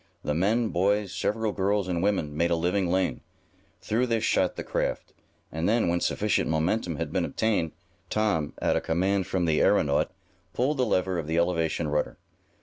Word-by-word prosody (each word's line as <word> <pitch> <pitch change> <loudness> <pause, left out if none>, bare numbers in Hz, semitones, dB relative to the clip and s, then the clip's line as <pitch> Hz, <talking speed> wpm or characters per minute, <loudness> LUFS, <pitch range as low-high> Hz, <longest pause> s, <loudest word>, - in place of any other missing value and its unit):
The 75 - -1
men, 110 +8 +1
boys, 100 +2 +1
several 110 0 -1
girls 100 0 0
and 85 -2 -1
women 90 -7 0
made 85 +2 +1
a 85 - +2
living 90 +2 0
lane. 95 +1 0 0.6
Through 120 +4 0
this 115 -2 0
shot - - +2
the - - -5
craft, - - -2 0.4
and 80 +4 -1
then, 115 -5 +2
when 85 +1 +1
sufficient 105 -1 +1
momentum 85 +3 0
had 80 -1 -4
been - - +1
obtained, 105 -8 0 0.4
Tom, 105 -9 0
at - - +1
a - - +1
command 95 +3 0
from 90 -2 0
the 80 -2 +2
aeronaut, 70 -1 +3 0.5
pulled 140 +4 +1
the 130 - +2
lever 95 -3 +1
of 75 - -5
the 80 +1 -1
elevation 85 -2 +1
rudder. 75 0 -1
90 Hz, 180 wpm, -27 LUFS, 80-105 Hz, 0.6 s, aeronaut